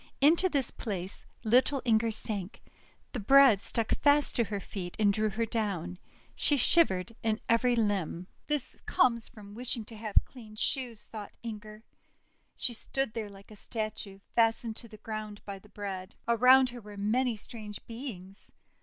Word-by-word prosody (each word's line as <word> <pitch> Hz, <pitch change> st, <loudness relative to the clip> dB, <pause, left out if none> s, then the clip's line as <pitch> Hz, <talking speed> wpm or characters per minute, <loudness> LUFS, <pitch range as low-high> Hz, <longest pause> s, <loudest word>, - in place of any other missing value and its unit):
Into 330 Hz, +6 st, +5 dB
this 280 Hz, -6 st, 0 dB
place 190 Hz, -3 st, -5 dB, 0.2 s
little 255 Hz, +5 st, +4 dB
Inger 225 Hz, -1 st, +3 dB
sank; 210 Hz, -2 st, -5 dB, 0.5 s
the 245 Hz, -, -3 dB
bread 260 Hz, -1 st, +7 dB
stuck 230 Hz, -1 st, -2 dB
fast 290 Hz, 0 st, +4 dB
to 235 Hz, -, +2 dB
her 205 Hz, -1 st, -3 dB
feet, 180 Hz, -2 st, -6 dB
and 205 Hz, -2 st, +4 dB
drew 215 Hz, +1 st, +1 dB
her 225 Hz, +3 st, -1 dB
down. 195 Hz, -6 st, -2 dB, 0.3 s
She 290 Hz, -, +2 dB
shiv 335 Hz, +6 st, +6 dB
ered 185 Hz, +4 st, -4 dB
in 220 Hz, 0 st, 0 dB
every 240 Hz, +2 st, +3 dB
limb. 200 Hz, -6 st, 0 dB, 0.2 s
'This 295 Hz, -3 st, -2 dB
comes 235 Hz, -3 st, +3 dB
from 205 Hz, -3 st, -12 dB
wishing 235 Hz, -1 st, -1 dB
to 225 Hz, -, -10 dB
have 215 Hz, -1 st, -6 dB
clean 220 Hz, -5 st, -13 dB
shoes," 240 Hz, -1 st, 0 dB
thought 210 Hz, -2 st, -8 dB
Inger. 215 Hz, -1 st, -7 dB, 0.7 s
She 245 Hz, -, 0 dB
stood 270 Hz, +1 st, -1 dB
there 220 Hz, -2 st, -4 dB
like 200 Hz, +1 st, -15 dB
a -, -, -10 dB
statue, 215 Hz, -2 st, -5 dB, 0.2 s
fastened 225 Hz, -1 st, +2 dB
to 235 Hz, -, -8 dB
the 215 Hz, -1 st, -12 dB
ground 215 Hz, -1 st, -6 dB
by 200 Hz, -1 st, -6 dB
the -, -, -19 dB
bread. 190 Hz, -3 st, -6 dB
Around 255 Hz, +3 st, +6 dB
her 240 Hz, 0 st, -8 dB
were 205 Hz, -1 st, -11 dB
many 235 Hz, +4 st, +1 dB
strange 210 Hz, -1 st, -7 dB
beings. 215 Hz, -6 st, -8 dB
220 Hz, 165 wpm, -30 LUFS, 205-245 Hz, 0.7 s, bread